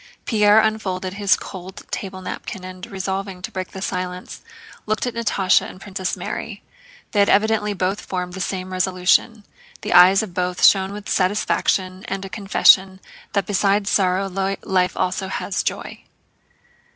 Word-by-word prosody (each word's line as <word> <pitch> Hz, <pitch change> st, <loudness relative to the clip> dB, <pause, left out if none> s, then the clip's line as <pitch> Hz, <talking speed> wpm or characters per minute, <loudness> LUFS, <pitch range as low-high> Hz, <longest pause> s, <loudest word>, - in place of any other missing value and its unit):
Pierre 210 Hz, -1 st, +5 dB
unfolded 190 Hz, -4 st, -1 dB
his 200 Hz, 0 st, +3 dB
cold 190 Hz, 0 st, -9 dB
table 190 Hz, -1 st, -5 dB
napkin 185 Hz, 0 st, -6 dB
and, 185 Hz, 0 st, -8 dB
resolving 190 Hz, 0 st, -4 dB
to -, -, -5 dB
break 185 Hz, -1 st, -4 dB
the 190 Hz, -, -8 dB
silence, 180 Hz, -1 st, -5 dB, 0.5 s
looked 215 Hz, +2 st, 0 dB
at 245 Hz, -, -3 dB
Natásha 205 Hz, -5 st, +2 dB
and -, -, -10 dB
at 185 Hz, -, -16 dB
Princess 190 Hz, -2 st, -4 dB
Mary. -, -, -6 dB, 0.5 s
They 205 Hz, -, 0 dB
had 200 Hz, -, +4 dB
evidently 210 Hz, 0 st, +2 dB
both 190 Hz, +2 st, -1 dB
formed 180 Hz, -1 st, -4 dB
the 190 Hz, -, -5 dB
same 185 Hz, 0 st, -4 dB
resolution; 185 Hz, +4 st, +1 dB, 0.4 s
the -, -, -2 dB
eyes 185 Hz, +3 st, +7 dB
of 195 Hz, -5 st, -8 dB
both 180 Hz, 0 st, +1 dB
shone 190 Hz, -1 st, +5 dB
with 210 Hz, 0 st, -8 dB
satisfaction 185 Hz, -1 st, 0 dB
and 195 Hz, 0 st, -4 dB
a -, -, -8 dB
confession 190 Hz, 0 st, +4 dB, 0.3 s
that 200 Hz, -2 st, +1 dB
besides 200 Hz, 0 st, +1 dB
sorrow 190 Hz, 0 st, +2 dB, 0.4 s
life 185 Hz, -2 st, 0 dB
also 185 Hz, +1 st, -1 dB
has 190 Hz, 0 st, -2 dB
joy. -, -, -4 dB
190 Hz, 155 wpm, -21 LUFS, 185-205 Hz, 0.5 s, eyes